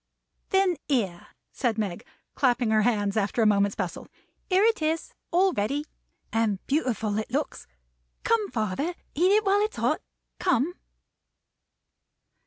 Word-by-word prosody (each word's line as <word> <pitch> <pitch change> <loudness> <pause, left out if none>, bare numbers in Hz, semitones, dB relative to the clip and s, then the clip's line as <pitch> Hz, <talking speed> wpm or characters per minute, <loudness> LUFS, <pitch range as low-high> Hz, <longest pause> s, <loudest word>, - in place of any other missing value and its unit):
"Then 385 -3 +3
here," 200 -11 -1 0.2
said 235 -5 -1
Meg, 200 -5 -2 0.3
clapping 245 -4 +2
her 215 0 +4
hands, 205 -3 +1
after 215 +2 +1
a - - +3
moment's 200 -1 +3
bustle; 180 -4 -4 0.4
"here 380 +1 +4
it 450 -5 +3
is, 315 +1 -1 0.2
all 370 +2 +3
ready! 275 +9 -1 0.5
And 225 -3 +2
beautiful 225 -8 0
it 220 - -4
looks! 280 +4 -3 0.6
Come, 440 -3 +2
father. 225 - -2 0.2
Eat 360 +6 +3
it 425 +1 +4
while 395 +1 +4
it's 425 +1 0
hot. - - +1 0.4
Come!" 340 -2 +2
255 Hz, 135 wpm, -26 LUFS, 215-355 Hz, 0.6 s, her